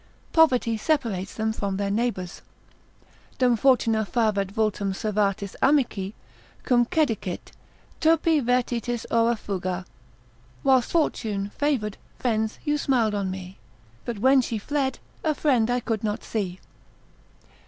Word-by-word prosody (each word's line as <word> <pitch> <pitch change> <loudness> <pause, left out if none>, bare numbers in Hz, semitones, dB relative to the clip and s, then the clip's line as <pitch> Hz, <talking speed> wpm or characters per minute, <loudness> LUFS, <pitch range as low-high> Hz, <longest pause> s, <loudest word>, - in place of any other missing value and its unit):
Poverty 250 -8 +4
separates 215 - -1
them 220 0 -1
from 200 -3 -2
their 200 0 -1
neighbours. 205 -5 -2 1.0
Dum 250 -2 +4
fortuna 225 -3 +3
favet 210 -3 +1
vultum 205 -2 0
servatis 200 -1 -1
amici, 235 -8 +2 0.5
Cum 240 -2 +3
cecidit, 225 - -1 0.5
turpi 320 -1 +3
vertitis 240 -1 0
ora 230 +1 +3
fuga. 185 -3 -4 0.8
Whilst 260 -2 +4
fortune 210 -11 0
favour'd, 255 -9 0 0.2
friends, 220 -3 -1
you 295 0 +1
smil'd 240 -7 +2
on 200 -2 -1
me, 185 0 -7 0.4
But 235 -3 -4
when 260 +5 +5
she 230 -2 -3
fled, 265 +4 -1 0.3
a 310 -1 +1
friend 250 -7 +2
I 245 0 +2
could 225 -2 -3
not 210 -1 -2
see. 190 -5 -3
225 Hz, 120 wpm, -25 LUFS, 200-255 Hz, 1.0 s, when